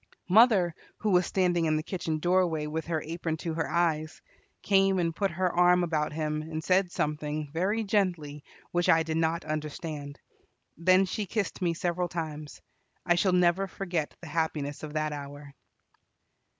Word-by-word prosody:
Mother, 200 -4 +5 0.2
who 215 - -1
was 180 -1 +3
standing 175 -3 +1
in 155 -1 +2
the 155 - -2
kitchen 165 -3 -3
doorway 175 -2 +1
with 160 +2 -4
her 160 -2 -1
apron 165 0 -3
to 165 0 -4
her 160 0 -2
eyes, 160 -2 0 0.4
came 195 -1 +3
and 165 -2 0
put 195 +1 0
her 180 +1 0
arm 180 0 +4
about 155 -3 -1
him, 155 0 -2
and 155 0 -5
said 185 +1 +2
something, 150 -1 -2
very 200 +7 0
gently, 175 -8 -1 0.3
which 175 +1 +1
I 165 -2 +5
did 160 0 -2
not 165 +1 0
understand. 150 -1 -5 0.6
Then 185 +3 +4
she 200 +2 -3
kissed 205 0 -2
me 170 -2 +1
several 175 0 -1
times. 155 -3 -6 0.4
I 175 - +4
shall 180 +2 +2
never 180 +2 +3
forget 175 -5 -3
the 175 - -9
happiness 150 -2 -2
of 150 -1 -7
that 155 -1 -1
hour. 145 0 -8
165 Hz, 165 wpm, -28 LUFS, 155-180 Hz, 0.6 s, Mother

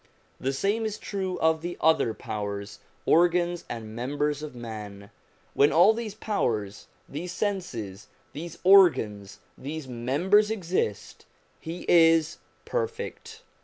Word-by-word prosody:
The 135 - -1
same 200 +11 0
is 215 -1 -3
true 190 -4 -4
of 160 0 +3
the 175 +1 -5
other 155 -8 +3
powers, 100 -1 -5 0.3
organs 175 +1 +3
and 110 -2 -7
members 145 +4 -2
of 150 -4 -7
man; 105 -4 -8 0.4
when 145 +2 +4
all 175 +8 +6
these 220 -2 -5
powers, 110 - -2 0.2
these 170 +5 -6
senses, 120 - -4 0.3
these 170 +3 -7
organs, 160 - +4 0.2
these 150 0 -6
members 145 - +2
exist, 175 - -3 0.3
he 165 +2 -7
is 165 -1 +4 0.3
perfect. 460 -1 -4
160 Hz, 120 wpm, -27 LUFS, 115-190 Hz, 0.4 s, all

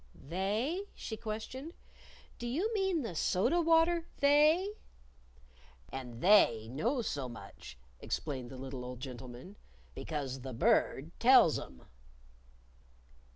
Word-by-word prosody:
"They?" 210 - -2
she 220 - -6
questioned. 235 - -6 0.6
"Do 240 - -4
you 355 - -1
mean 385 -7 +1
the 225 - -4
soda 240 - +2
water 330 +1 +3
They?" 305 +8 +4 1.2
"And 125 -3 -7
They 145 - +5
know 235 - 0
so 140 - -3
much," 90 - -11 0.2
explained 130 -4 -4
the 130 - -9
little 130 -1 -6
old 125 0 -7
gentleman, 130 - -9 0.4
"because 140 -4 -4
the 130 0 -7
Bird 115 - +2
tells - - +6
'em." 65 - -11
200 Hz, 110 wpm, -32 LUFS, -, 1.2 s, tells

